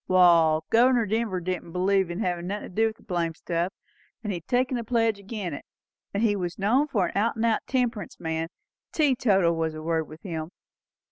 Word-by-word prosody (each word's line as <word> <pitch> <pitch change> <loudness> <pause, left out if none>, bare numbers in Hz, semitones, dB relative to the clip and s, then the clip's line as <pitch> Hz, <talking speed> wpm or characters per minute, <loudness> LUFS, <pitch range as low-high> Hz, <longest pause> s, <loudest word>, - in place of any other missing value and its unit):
Wall, 170 -4 +5
Governor 240 0 +5
Denver 215 -2 -1
didn't 180 -1 -4
believe 190 0 +2
in 175 +5 -4
havin' 175 -3 -1
nothin' 205 +2 -4
to - - -17
do 225 +1 +4
with 220 - -5
the - - -21
blamed 170 -4 -2
stuff; 170 +2 -1 0.5
and 210 -2 -2
he - - -2
had 170 - -13
taken 255 +1 +1
the 235 - -2
pledge 225 -2 +1
agin 200 -4 -5
it, 140 - -7 0.5
and 200 +3 -1
he 210 -3 +3
was 180 -2 -3
known 245 +9 +2
for 195 - +1
an - - -11
out 215 +4 +1
and 225 +1 0
out 225 -1 +3
temperance 240 -6 -1
man; 160 0 -2 0.4
teetotal 210 - +3
was 160 -1 -1
the 155 0 -7
word 160 -1 0
with 155 +1 -13
him. 160 -4 -4
190 Hz, 210 wpm, -26 LUFS, 170-225 Hz, 0.5 s, Wall